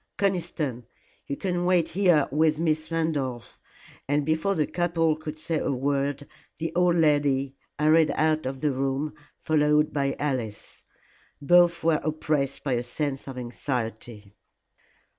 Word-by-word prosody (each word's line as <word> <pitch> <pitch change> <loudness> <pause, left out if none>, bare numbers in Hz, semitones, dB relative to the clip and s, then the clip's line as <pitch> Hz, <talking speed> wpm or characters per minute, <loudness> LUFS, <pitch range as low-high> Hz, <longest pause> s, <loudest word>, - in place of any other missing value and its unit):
Conniston, 170 - -1 0.4
you 140 - -3
can 180 -2 -1
wait 175 -2 +2
here 175 -6 +3
with 155 +1 +2
Miss 155 -1 0
Randolph," 145 -7 -2 0.5
and 145 +1 +1
before 160 +6 +1
the 150 - +1
couple 165 -2 0
could 155 0 -7
say 155 0 -1
a - - -1
word, 140 +1 -1 0.3
the 165 0 -4
old 180 -1 +3
lady 145 -4 +2 0.2
hurried 155 +1 +4
out 155 -2 +1
of 135 0 -5
the 150 -2 +1
room, 135 +3 -2 0.2
followed 150 -1 +2
by 140 -1 0
Alice. 125 -8 -4 0.6
Both 170 +3 +4
were 160 -2 +2
oppressed 150 -2 -1
by 135 - 0
a 120 - 0
sense 135 +3 -3
of 135 -2 -7
anxiety. 115 -4 -5
150 Hz, 140 wpm, -26 LUFS, 135-160 Hz, 0.6 s, hurried